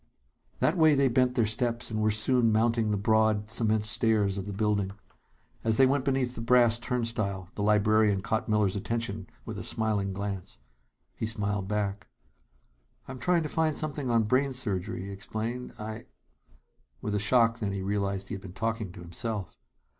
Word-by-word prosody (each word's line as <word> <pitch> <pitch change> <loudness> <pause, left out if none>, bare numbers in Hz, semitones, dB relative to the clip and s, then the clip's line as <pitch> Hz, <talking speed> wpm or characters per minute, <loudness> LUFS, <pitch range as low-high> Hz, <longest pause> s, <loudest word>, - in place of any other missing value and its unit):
That 165 - +1
way 155 -2 +6
they 135 -1 +3
bent 125 +1 +2
their 115 - +3
steps, 115 +2 -1
and 110 -1 -1
were 110 - +3
soon 115 +2 +3
mounting 115 0 +2
the 105 - +1
broad 110 0 +2
cement 110 -2 +1
stairs 110 -3 +2
of 95 - -6
the - - -4
building. 100 -1 0 0.7
As 110 -1 +2
they 135 - +7
went 135 +1 +1
beneath 130 -3 0
the 115 - -6
brass 120 -1 +4
turnstile, 115 -7 -2
the 105 - -5
librarian 105 -1 +3
caught 110 +1 -1
Miller's 105 -3 +2
attention 115 +3 -3 0.2
with - - -6
a - - -6
smiling 105 -3 0
glance. 100 -1 -5 0.6
He 110 - -3
smiled 105 -3 -1
back. 105 0 -2 1.0
"I'm 130 -1 -7
trying 175 +1 +2
to - - -2
find 160 -1 +1
something 145 -4 -2
on 115 -1 +3
brain 130 +5 +1
surgery," 110 -4 -2
he 100 - -6
explained. 110 +5 -4
"I 110 +1 -7 0.5
" - - -37
With 105 - -2
a 105 - +1
shock, 115 +1 +3
then, 105 -3 -2
he 100 -1 -3
realized 100 0 -2
he - - -4
had 100 - -5
been 95 -2 -10
talking 110 -1 -2
to - - -11
himself. 95 +2 -4
110 Hz, 180 wpm, -28 LUFS, 100-120 Hz, 1.0 s, they